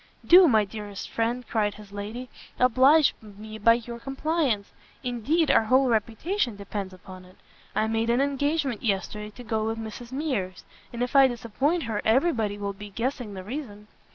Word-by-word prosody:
"Do, 360 +1 +8
my 220 -6 +4
dearest 205 -1 -8
friend," 235 +2 -1
cried 210 -3 0
his 210 -1 -13
lady, 210 +5 -6 0.3
"oblige 260 +4 +5
me 215 +1 -10
by 230 +2 +6
your 235 0 -7
compliance; 270 -5 -1 0.3
indeed 265 +7 +1
our 225 - +4
whole 260 +3 +4
reputation 235 - 0
depends 200 -1 -5
upon 185 0 -12
it. 185 +1 -18 0.4
I 215 - +2
made 225 +1 0
an 240 +2 +3
engagement 280 -2 0
yesterday 210 0 -2
to 240 +4 -12
go 220 -2 -1
with 225 0 -2
Mrs 225 +2 -8
Mears, 260 -11 -3 0.3
and 240 +1 -2
if 250 - -4
I 270 -1 +8
disappoint 265 +7 -1
her, 220 -2 -2
every 270 +10 +3
body 210 -4 -2
will 200 -1 -3
be 205 +1 -10
guessing 230 0 -3
the 185 - -7
reason." 210 -3 -7
230 Hz, 175 wpm, -26 LUFS, 210-265 Hz, 0.4 s, Do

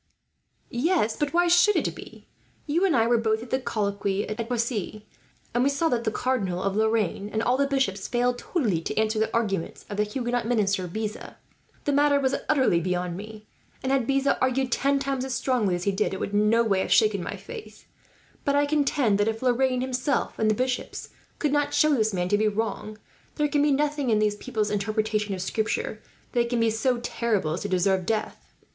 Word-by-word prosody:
"Yes, 245 - +1
but 295 -1 -1
why 350 +1 +3
should 350 +4 +5
it - - 0
be? - - -12 0.4
You 330 +5 +1
and 350 -6 +2
I 225 -2 +4
were 235 0 +3
both 220 0 0
at 240 - -12
the 260 - +2
colloquy 200 -4 -1
at 220 +2 -4
Poissy, 225 -3 -2 0.5
and 240 +1 +2
we 275 - +3
saw 280 +4 +1
that 235 -1 -1
the 220 - +1
Cardinal 200 -9 -1
of 195 0 -1
Lorraine, 215 -2 0
and 220 +1 -1
all 245 +2 +2
the 280 +1 +1
bishops, 265 -9 -1
failed 245 0 0
totally 220 - -1
to - - -5
answer 220 0 +1
the 220 - 0
arguments 205 -7 -2
of 205 - -4
the 210 - +3
Huguenot 240 +2 -2
minister 200 -6 +1
Beza. 215 +4 -5 0.5
The 290 - +2
matter 285 0 +4
was 265 -1 +1 0.2
utterly 260 - +3
beyond 180 0 -2
me 215 +2 -9 0.4
and, 260 - 0
had 265 -4 +1
Beza 275 0 +1
argued 255 0 +1
ten 280 +3 +2
times 275 -1 -2
as 265 -2 -3
strongly 240 -7 +1
as 175 - -4
he 200 - +1
did, 195 0 -1
it - - -6
would 200 - -4
in 210 +1 +3
no 230 +1 +4
way 200 -4 +1
have - - -2
shaken 210 -3 +4
my - - -4
faith; 460 -3 -10 0.6
but 280 - +1
I 290 0 +3
contend 280 -7 +1
that 205 - +2
if 225 +2 -2
Lorraine 255 0 +2
himself 260 +2 -1
and 220 - +2
the 215 - +2
bishops 255 +1 -3 0.3
could 300 - 0
not 290 0 +1
show 305 +1 +4
this 220 -5 +2
man 180 -2 -1
to 205 - +2
be 215 - +3
wrong, 215 0 -3 0.4
there 300 -1 +1
can 290 0 +1
be 295 - +3
nothing 290 -1 0
in 220 - +3
these 210 -1 +1
people's 215 -1 -2
interpretation 215 0 -1
of 185 - -4
Scripture 215 +1 -2 0.3
that 235 -1 +1
can 240 -1 0
be 230 -1 +3
so 240 +3 +1
terrible 210 -12 -1
as 170 - -4
to 205 - -3
deserve 185 0 +1
death. 220 -1 -3
230 Hz, 215 wpm, -26 LUFS, 210-265 Hz, 0.6 s, should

